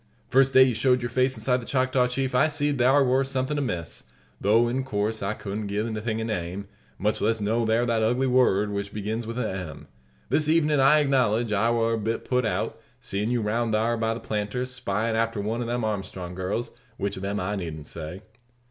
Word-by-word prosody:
First 135 +1 +3
day 130 - +9
you 130 -2 +2
showed 125 +2 +2
your 120 - -3
face 130 0 +1
inside 125 +3 +1
the - - -9
Choctaw 130 -1 +2
Chief 130 +1 -2
I 125 +5 +4
seed 145 -2 -1
thar 135 +3 +5
war 130 +2 +3
something 135 +2 -1
amiss; 90 - -4 0.4
tho', 115 +4 +4
in 130 +3 -1
course, 110 -3 -1
I 100 +2 -2
couldn't 105 +1 -5
gie 100 +1 -2
the 110 -1 -2
thing 110 0 -2
a - - -2
name, 100 -3 -3 0.3
much 105 +2 -1
less 110 +1 +1
know 110 +2 0
'thar 115 +2 +2
that 115 -2 +1
ugly 120 +4 +2
word 115 -6 +3
which 100 0 -4
begins 110 +2 -3
with 115 +1 -5
a 125 -3 0
M. 90 -7 -6 0.4
This 155 -1 +2
evenin', 155 -2 +3
I 135 +3 +6
acknowledge, 120 -5 +1
I 105 +3 +2
war 115 -1 +1
a 115 - -1
bit 110 +2 -2
put 125 -2 +1
out - - -2 0.2
seein' 105 +3 -2
you 120 -1 +1
round 115 +2 0
thar 115 +2 +2
by 115 0 -1
the - - -6
planter's, 110 +4 -3
spyin' 110 -2 -1
after 115 -1 0
one 110 +4 -2
of 120 - -3
them 120 0 -1
Armstrong 95 -4 -4
girls; 95 +6 -3 0.3
which 100 0 -2
of 95 - -7
them 100 +1 -2
I 100 +3 -2
needn't 80 -6 -5
say." 85 +5 -7
115 Hz, 220 wpm, -26 LUFS, 105-125 Hz, 0.4 s, day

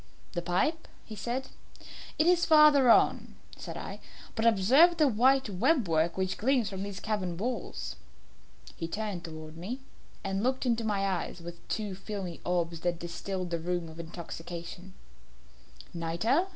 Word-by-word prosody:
"The 175 - -2
pipe," 185 - 0 0.3
said 245 +6 -3 0.7
he. - - +4
"It - - +1
is 350 -1 +4
farther 300 -5 +7
on," - - +4 0.2
said - - -7
I; - - -6 0.3
"but 225 0 +1
observe 260 - +6
the 305 - +5
white 265 +3 +4
web 215 - +2
work 165 +1 +1
which 190 0 -1
gleams 240 -3 +2
from 190 -1 -5
these 200 -1 -5
cavern 185 -4 -2
walls." 240 +6 -4 0.8
He 165 - -4
turned 205 -1 -4
towards 155 -1 -9
me, 215 +10 -5 0.4
and 195 0 -1
looked 260 +3 0
into 235 -2 +1
my 205 -3 0
eyes 185 -2 -2
with 170 0 -10
two 210 -3 -2
filmy 190 -3 -6
orbs 170 -2 -1
that 175 0 -1
distilled 180 +1 -4
the 170 - -1
rheum 175 0 -2
of 160 +1 -11
intoxication. 170 +2 -8 1.0
"Nitre?" 175 - +1
195 Hz, 150 wpm, -30 LUFS, 170-245 Hz, 1.0 s, farther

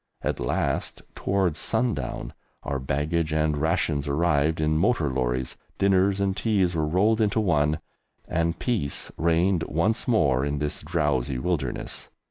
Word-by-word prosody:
At - - -1
last, - - -1
towards 95 -5 0
sundown, 110 - -1 0.3
our 70 -1 -2
baggage 75 +5 -1
and 75 -1 +1
rations 75 -2 0
arrived 75 +1 +1
in 75 0 +1
motor 80 - +2
lorries, 65 0 -1 0.2
dinners 95 0 +3
and 100 -1 0
teas 100 -6 +1
were 80 -2 0
rolled 105 +7 +2
into 105 +1 +2
one, 75 -6 +2 0.5
and 85 0 0
peace 105 - -1
reigned 85 +2 +2
once 85 +8 0
more 70 - +3
in 70 +1 -1
this 75 +1 -2
drowsy 75 -5 0
wilderness. 75 -4 -2
80 Hz, 135 wpm, -25 LUFS, 70-95 Hz, 0.5 s, dinners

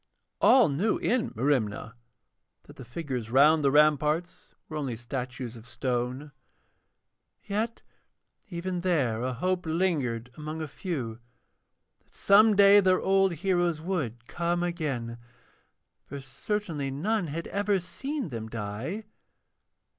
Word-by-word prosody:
All 260 -3 +6
knew 170 +10 +1
in 240 -1 0
Merimna 115 -4 0 0.7
that - - -16
the - - -8
figures 125 -3 -5
round 150 +5 +5
the 140 - +4
ramparts 150 +3 +2
were 155 - -8
only 140 -6 -2
statues 125 0 -5
of 115 0 -13
stone, 125 +3 -3 1.1
yet 220 +3 -3 0.7
even 180 0 -3
there 140 -11 +1
a 130 +1 -1
hope 180 +6 -1
lingered 145 -9 -1
among 155 +1 -6
a 155 - -3
few 130 - -5 0.8
that - - -27
some 210 +2 +5
day 200 0 +8
their 185 -2 +3
old 195 -1 +3
heroes 175 -1 0
would 145 - -3
come 175 0 -1
again, 135 -10 -3 0.9
for 140 - -6
certainly 145 - -3
none 180 +8 -1
had 165 +3 -4
ever 205 0 +1
seen 265 - -4
them 115 -3 -6
die. 115 - -5
155 Hz, 125 wpm, -28 LUFS, 125-185 Hz, 1.1 s, day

